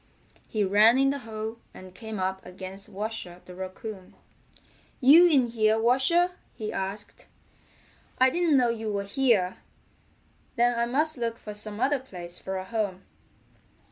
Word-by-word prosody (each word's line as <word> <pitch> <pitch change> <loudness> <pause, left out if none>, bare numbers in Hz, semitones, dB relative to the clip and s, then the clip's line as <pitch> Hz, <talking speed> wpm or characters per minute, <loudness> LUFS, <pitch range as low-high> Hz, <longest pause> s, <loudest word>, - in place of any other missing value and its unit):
He 215 -2 -1
ran 210 +5 +5
in 270 0 +3
the 280 - -3
hole, 220 -1 -6 0.2
and 185 -1 -12
came 220 +1 -7
up 190 0 -2
against 190 +3 -9
Washer 205 -3 -5
the 180 - -11
Raccoon. 190 +1 -8 0.8
"You 305 +7 +8
in 270 -7 +3
here, 220 -1 +2
Washer?" 270 +10 +3 0.2
he 215 -1 -5
asked. 195 +2 -6 0.9
"I 260 0 +5
didn't 340 -3 +3
know 245 -2 +3
you 225 -2 -3
were 200 -1 -2
here. 200 -4 +1 1.0
Then 240 0 +3
I 235 - +1
must 300 +3 +1
look 230 -1 -2
for 210 - -8
some 210 0 -5
other 280 +3 +2
place 180 -8 -10
for 190 0 -4
a 185 - -5
home." 200 -3 -3
220 Hz, 150 wpm, -27 LUFS, 195-250 Hz, 1.0 s, You